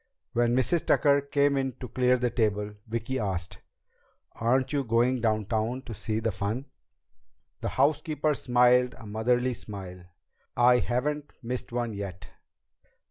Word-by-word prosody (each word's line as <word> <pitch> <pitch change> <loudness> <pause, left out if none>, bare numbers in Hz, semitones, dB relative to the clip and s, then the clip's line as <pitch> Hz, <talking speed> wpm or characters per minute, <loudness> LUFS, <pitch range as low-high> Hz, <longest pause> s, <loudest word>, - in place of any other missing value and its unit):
When 120 0 +2
Mrs. 140 +6 +2
Tucker 140 -1 +4
came 140 0 +2
in 135 -1 -1
to 125 - -8
clear 125 +1 +2
the 125 -1 0
table, 105 -3 0
Vicki 115 +4 -2
asked, 95 -4 -3 0.7
"Aren't 130 +5 +1
you 140 -1 +1
going 120 +2 +2
downtown 110 +3 0
to 120 - -7
see 110 +2 -2
the 115 0 0
fun?" 105 +7 -3 0.9
The - - -2
housekeeper 150 +2 +1
smiled 125 -1 +3
a 115 - -12
motherly 120 +4 +1
smile. 95 -5 -9 0.5
"I 125 0 +6
haven't 145 +5 -2
missed 125 +1 -4
one 120 -2 -2
yet." 100 -2 -7
120 Hz, 135 wpm, -28 LUFS, 110-130 Hz, 0.9 s, I